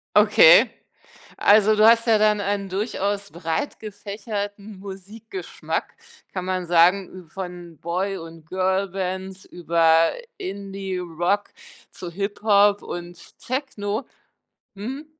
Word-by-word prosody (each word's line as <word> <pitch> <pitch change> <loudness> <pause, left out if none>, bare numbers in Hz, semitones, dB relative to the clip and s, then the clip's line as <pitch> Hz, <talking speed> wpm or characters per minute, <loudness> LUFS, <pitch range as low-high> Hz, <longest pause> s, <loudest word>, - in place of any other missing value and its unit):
Okay, - - +7 0.7
also 215 +1 +5
du 215 +1 +5
hast 230 +1 +5
ja 220 -1 +5
dann 210 -1 +3
ein 200 -1 -2
durchaus 200 0 -2
breitgefächerten 205 - -5
Musikgeschmack, 205 - -6 0.4
kann 185 -2 -3
man 185 -1 -2
sagen, 180 +1 +2
von 175 -2 -8
Boy 190 +4 -2
und 165 -1 -11
Girlbands 190 0 -2
über 165 -1 +3 0.3
Indie 195 -1 -5
Rock 175 +4 -1 0.4
zu 175 - -8
Hiphop 205 +1 +2
und 175 0 -9
Techno. 240 -4 -3 0.7
Mhm. 260 +10 -6
195 Hz, 100 wpm, -23 LUFS, 180-205 Hz, 0.7 s, Okay